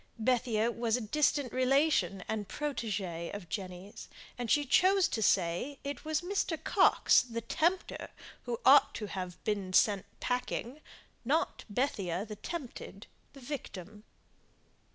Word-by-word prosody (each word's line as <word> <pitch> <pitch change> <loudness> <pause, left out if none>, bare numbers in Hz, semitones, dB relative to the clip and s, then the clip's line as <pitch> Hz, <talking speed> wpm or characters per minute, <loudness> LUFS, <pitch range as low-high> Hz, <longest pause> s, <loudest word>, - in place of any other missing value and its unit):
Bethia 230 -1 +1
was 235 0 0
a - - -4
distant 280 +2 +1
relation 255 - +2
and 215 -2 -3
protÄgÄe 205 - -3
of 200 -4 -8
Jenny's, 185 0 -7 0.3
and 240 -2 -4
she 290 +4 +3
chose 380 +6 +4
to 230 - -3
say 190 +8 +1
it 285 +1 -5
was 310 0 -1
Mr. 360 -2 -1
Coxe - - +5
the 230 -2 -5
tempter 345 - -1 0.4
who 475 - -3
ought - - +7
to 215 - -4
have 185 -3 -5
"been 200 -3 -2
sent 200 0 +3
packing," 250 +2 -3 0.4
not 300 +7 0
Bethia 200 -6 -1
the 210 -1 -8
tempted, 245 - -7 0.3
the 275 - -13
victim. 215 - -7
230 Hz, 135 wpm, -31 LUFS, 200-285 Hz, 0.4 s, ought